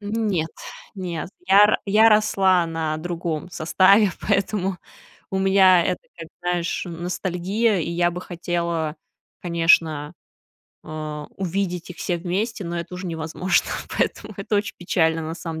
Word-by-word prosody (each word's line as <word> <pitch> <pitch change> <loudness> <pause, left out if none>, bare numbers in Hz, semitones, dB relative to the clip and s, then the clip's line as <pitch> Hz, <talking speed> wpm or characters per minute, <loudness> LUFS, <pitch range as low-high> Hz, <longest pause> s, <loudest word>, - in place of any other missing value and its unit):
М, 220 +2 -2
нет, 165 -5 0 0.5
нет. 175 -5 -4 0.2
Я 200 +2 +7
р 210 - +3
я 215 +3 +6
росла 195 -5 +3
на 160 -1 -2
другом 170 -1 -4
составе, 190 +5 +4
поэтому 195 -2 0 0.5
у 190 - -1
меня 190 -2 +5
это, 180 - -1
как 165 -1 -9
знаешь, 175 -1 -1
н 170 -1 -7
ностальгия, 190 +4 0
и 165 - -2
я 175 0 +1
бы 175 +1 -6
хотела, 170 -3 -3 0.5
конечно, 165 -3 +2 0.7
а, 155 -1 -6
увидеть 180 -2 -3
их 180 - -9
все 175 - -2
вместе, 195 +5 -3
но 170 0 -3
это 170 +2 -6
уже 185 +1 -6
невозможно, 165 +3 -1 0.3
поэтому 215 -1 -1
это 205 +1 -1
очень 205 0 -2
печально 165 -2 +1
на 160 +1 -4
самом 165 -2 -6
175 Hz, 145 wpm, -23 LUFS, 165-195 Hz, 0.7 s, Я